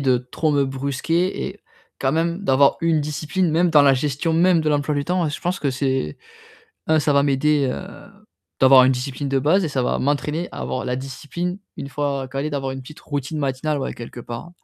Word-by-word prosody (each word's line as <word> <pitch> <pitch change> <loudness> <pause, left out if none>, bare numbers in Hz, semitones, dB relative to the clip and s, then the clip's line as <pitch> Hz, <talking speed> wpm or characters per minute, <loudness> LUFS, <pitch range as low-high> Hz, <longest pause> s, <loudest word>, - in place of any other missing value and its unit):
de 130 -2 +3
trop 125 +5 -2
me 145 -1 +2
brusquer 140 +7 -1
et - - -11 0.4
quand 135 - +2
même, 170 +2 0
d'avoir 140 -4 +4
une 165 -2 +2
discipline, 150 +4 -1
même 170 +3 +2
dans 150 -2 +6
la 140 -1 +5
gestion-même 160 +6 +2
de 155 - 0
l'emploi 145 0 +1
du 140 - -1
temps. 175 0 0
Je 145 - -5
pense 180 +2 -2
que 140 - 0
c'est 130 - -1 0.7
non, 160 0 +4
ça 150 -1 +2
va 140 0 +4
m'aider, 140 0 +2
heu, 195 +2 -9 0.5
d'avoir 130 0 +8
une 130 - +4
discipline 135 +2 -3
de 135 0 +1
base 165 +8 +3
et - - -1
ça 135 -3 -1
va - - 0
m'entraîner 150 +4 -1
à - - -9
avoir 130 - -3
la 125 0 -1
discipline, 145 +7 -5 0.2
une 140 - -6
fois 140 -1 -2
calé, 135 +3 -3
d'avoir 135 -2 -2
une 135 0 -7
petite 150 +4 -12
routine 145 +1 -4
matinale, 140 +2 -1
ouais 135 - -3
quelque 120 +1 -9
part. 120 +7 -7
145 Hz, 210 wpm, -22 LUFS, 135-160 Hz, 0.7 s, d'avoir